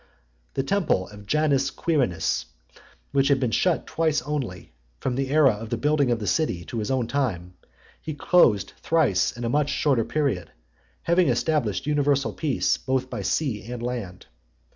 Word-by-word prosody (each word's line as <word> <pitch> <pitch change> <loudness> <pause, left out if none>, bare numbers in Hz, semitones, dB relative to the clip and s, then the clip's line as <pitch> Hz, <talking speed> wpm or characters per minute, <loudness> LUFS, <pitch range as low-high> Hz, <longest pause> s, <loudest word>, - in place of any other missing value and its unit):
XXII. - - -37
The 135 - 0
temple 150 - +1
of 105 -1 -13
Janus 145 -2 +2
Quirinus, 130 - 0 0.7
which 135 0 +2
had 140 -2 +3
been 125 -3 0
shut 175 +7 +1
twice 160 -5 0
only, 130 - -4 0.3
from 130 - -1
the 135 +1 -2
era 145 -2 +5
of 110 +1 -6
the 120 - -1
building 145 +1 +2
of 120 - +2
the 110 - -5
city 95 - 0
to 115 - -4
his 105 - -3
own 130 -3 +1
time, 110 -10 -2 0.5
he 155 -2 -5
closed 115 - +3
thrice 100 - +2
in 120 - -6
a - - 0
much 145 +3 +1
shorter 135 -6 +2
period, 125 - -1 0.5
having 175 +1 +3
established 120 - 0
universal 145 -2 +1
peace 150 -5 0
both 130 -1 -2
by - - -3
sea 110 +2 -2
and 120 -1 -5
land. 115 -7 -5
130 Hz, 170 wpm, -25 LUFS, 105-150 Hz, 0.7 s, era